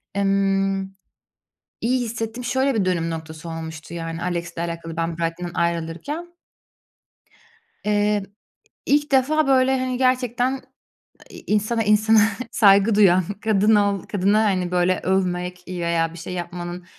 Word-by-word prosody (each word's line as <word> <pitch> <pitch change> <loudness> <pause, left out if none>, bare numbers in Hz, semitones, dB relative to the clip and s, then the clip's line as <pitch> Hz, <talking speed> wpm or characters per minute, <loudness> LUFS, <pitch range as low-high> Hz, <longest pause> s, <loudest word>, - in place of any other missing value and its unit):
emm, 195 -1 +1 1.0
iyi 250 +2 +1
hissettim. 225 +1 -5
Şöyle 260 +2 +1
bir 205 -4 +1
dönüm 170 -3 0
noktası 160 0 -7
olmuştu, 160 0 -7
yani, 165 -1 -5
Alex'le 170 -1 -3
alakalı 165 -1 -5
ben 165 0 -2
Brighton'dan 170 +1 -3
ayrılırken 170 - -2 1.6
eee, 210 -1 +1 0.6
ilk 290 +1 +2
defa, 300 +4 +3
böyle, 265 0 +3
hani, 255 -1 -2
gerçekten, 255 0 +1 0.7
iii, - - -12
insana 215 +2 +1
insana 215 +1 +4 0.3
saygı 200 0 +5
duyan, 185 -3 +5 0.2
kadın 215 0 +3
ol 200 -2 +1
kadına, 205 +2 +1
hani, 185 -3 0
böyle, 180 0 +2
övmek 180 -1 -1
veya 170 -2 -1
bir - - -10
şey 170 +2 -7
yapmanın, 175 0 -6
195 Hz, 125 wpm, -22 LUFS, 170-225 Hz, 1.6 s, saygı